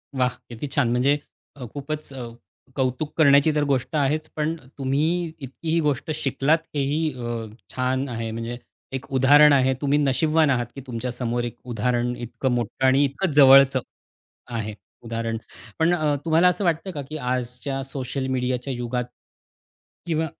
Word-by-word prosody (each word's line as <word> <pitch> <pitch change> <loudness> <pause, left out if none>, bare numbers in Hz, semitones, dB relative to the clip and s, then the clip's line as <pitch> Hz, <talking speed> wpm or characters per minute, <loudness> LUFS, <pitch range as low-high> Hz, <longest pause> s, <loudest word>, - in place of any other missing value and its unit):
वाह! 125 -1 +1
किती 120 +5 -5
छान 140 -4 +2
म्हणजे 130 +4 +3 0.4
अ, 130 -3 -7
खूपच 150 +1 -5
अ, 125 -3 -6 0.5
कौतुक 130 +3 -1
करण्याची 145 0 +6
तर 150 - +2
गोष्ट 140 0 -1
आहेच. 150 +2 0
पण 155 +1 -1 0.2
तुम्ही 155 +6 0
इतकी 135 +4 -7
ही 165 +1 +3
गोष्ट 150 +1 -1
शिकलात 150 +1 +2 0.2
हेही 150 +3 0
अ, 120 -2 -4 0.3
छान 130 +1 0
आहे 115 -2 -3
म्हणजे 115 +2 -4 0.4
एक 130 0 -4
उदाहरण 145 +3 +7
आहे 130 -1 +4
तुम्ही 145 0 +2
नशीबवान 155 +3 +3
आहात 120 -2 +1
की 135 - -7
तुमच्या 125 +1 -3
समोर 120 0 -2
एक 120 - -5
उदाहरण 120 +1 0
इतकं 120 +2 -3
मोठं 120 +2 -1
आणि 135 +2 +4
इतकं 150 +6 -2
जवळचं 135 -1 +7 0.7
आहे, 110 -3 -3 0.3
उदाहरण. 115 -1 -3 0.4
पण 165 +2 +4
अ, 155 -4 +1
तुम्हाला 165 +2 +4
असं 180 +3 +1
वाटतं 170 +2 0
का 150 -5 -5
की 155 - -4
आजच्या 125 +1 -3
सोशल 135 0 -4
मीडियाच्या 130 0 -1
युगात 120 0 -2 1.0
किंवा 160 -2 0
135 Hz, 155 wpm, -24 LUFS, 125-150 Hz, 1.0 s, उदाहरण